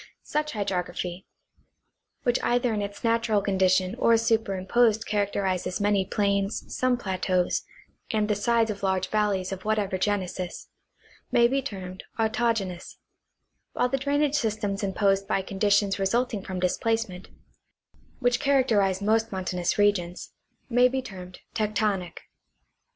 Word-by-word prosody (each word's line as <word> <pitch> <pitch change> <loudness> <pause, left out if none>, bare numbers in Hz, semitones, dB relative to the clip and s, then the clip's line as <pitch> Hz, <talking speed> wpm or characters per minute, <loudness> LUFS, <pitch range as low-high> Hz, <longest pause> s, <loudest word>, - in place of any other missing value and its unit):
Such 300 0 -2
hydrography 180 -3 -3 1.0
(which 245 -1 +1
either 245 -1 +1
in 210 - -1
its 200 0 -6
natural 230 -2 +2
condition 190 -1 +2
or 230 0 +5
superimposed 225 0 +2
characterizes 195 -3 -1
many 205 -2 +2
plains, 200 +1 -1
some 255 -1 +2
plateaus, 185 -4 0 0.5
and 215 -1 +1
the 210 - +2
sides 225 +2 +2
of 200 - -7
large 190 -1 0
valleys 205 -3 0
of 190 -1 -5
whatever 210 -3 0
genesis) 185 -3 -2 0.6
may 235 0 +5
be 270 +3 0
termed 185 -5 -7
autogenoics; 220 -5 -1 0.8
while 250 - +1
the 270 +1 0
drainage 285 +1 +1
systems 215 -5 -1
imposed 195 0 +1
by 195 -2 0
conditions 200 +1 +1
resulting 225 +2 0
from 185 -1 -5
displacement 190 +1 -1 0.9
(which 245 -1 +1
charactei'ize 225 -9 +2
most 225 +2 +2
mountainous 180 -2 -1
regions) 190 -4 0 0.3
may 245 0 +5
be 260 +1 -2
termed 185 -5 -10
tectonic. 210 -4 -1
205 Hz, 125 wpm, -26 LUFS, 190-230 Hz, 1.0 s, or